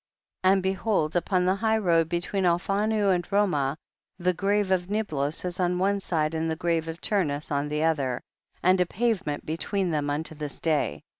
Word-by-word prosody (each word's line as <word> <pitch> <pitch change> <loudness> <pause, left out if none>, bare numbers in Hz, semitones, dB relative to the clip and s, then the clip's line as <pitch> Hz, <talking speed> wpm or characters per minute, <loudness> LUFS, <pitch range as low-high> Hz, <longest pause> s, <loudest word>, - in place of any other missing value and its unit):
27. 185 - +5
And 190 - -1
behold 190 -4 0
upon 180 +1 +1
the 185 - +3
high 220 +2 +1
road 165 -6 +2
between 180 +3 -1
Alphanu 200 +3 +2
and 175 -1 0
Romah 180 -9 +1 0.4
the 180 0 +1
grave 200 +2 +1
of 180 -1 +1
Niblos 160 -8 -1
is 180 0 -4
on 180 0 +1
one 200 +2 +1
side 160 -5 -1
and 160 0 -1
the 160 - -1
grave 165 -1 0
of 165 +1 -5
Turnus 155 -10 -1
on 145 +1 0
the 150 +1 -1
other, 140 -6 +1 0.4
and 185 +1 +4
a 180 - +2
pavement 195 -9 -1
between 175 +4 -1
thera 145 -2 -1
unto 155 +2 -2
this 150 -2 -6
day. 155 -3 0
175 Hz, 190 wpm, -26 LUFS, 155-195 Hz, 0.4 s, 27